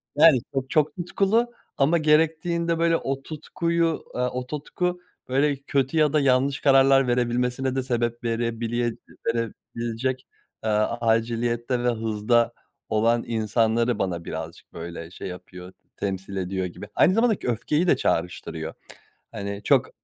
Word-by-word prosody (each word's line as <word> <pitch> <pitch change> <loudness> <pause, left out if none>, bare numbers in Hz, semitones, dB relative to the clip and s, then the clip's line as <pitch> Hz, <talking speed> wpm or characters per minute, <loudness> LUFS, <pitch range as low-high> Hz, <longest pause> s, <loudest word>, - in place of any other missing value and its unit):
yani 150 -2 +7
çok, 135 -1 -2
çok 150 -1 +2
tutkulu 200 +6 +1 0.3
ama 150 +5 +4
gerektiğinde 165 +2 +2
böyle 165 0 +3
o 135 0 -3
tutkuyu, 165 +1 -1
eee, 125 - -1
o 125 0 -2
tutku 180 +5 -3 0.3
böyle 140 +3 +2
kötü 140 +1 -1
ya 150 -2 +4
da 155 - +4
yanlış 135 0 +2
kararlar 135 -1 +5
verebilmesine 125 +2 0
de 135 - 0
sebep 120 -1 -1
verebile 115 0 -1 0.3
verebilecek, 115 +2 -3 0.4
eee, 110 - 0 0.3
aciliyette 120 +2 0
ve 125 - +3
hızda 115 +1 +1 0.4
olan 115 +2 +2
insanları 115 +1 +1
bana 85 -3 -2
birazcık 80 +1 -7
böyle 85 0 -7
şey - - -7
yapıyor 90 0 -9 0.2
temsil 95 0 -4
ediyor 95 0 -2
gibi 90 +3 -8
aynı 185 - +5
zamanda 225 -1 +3
k - - -6
öfkeyi 150 - 0
de - - +4
çağrıştırıyor. 90 +2 -2 0.6
Hani 100 -2 -5
çok - - +3
125 Hz, 135 wpm, -25 LUFS, 115-150 Hz, 0.6 s, yani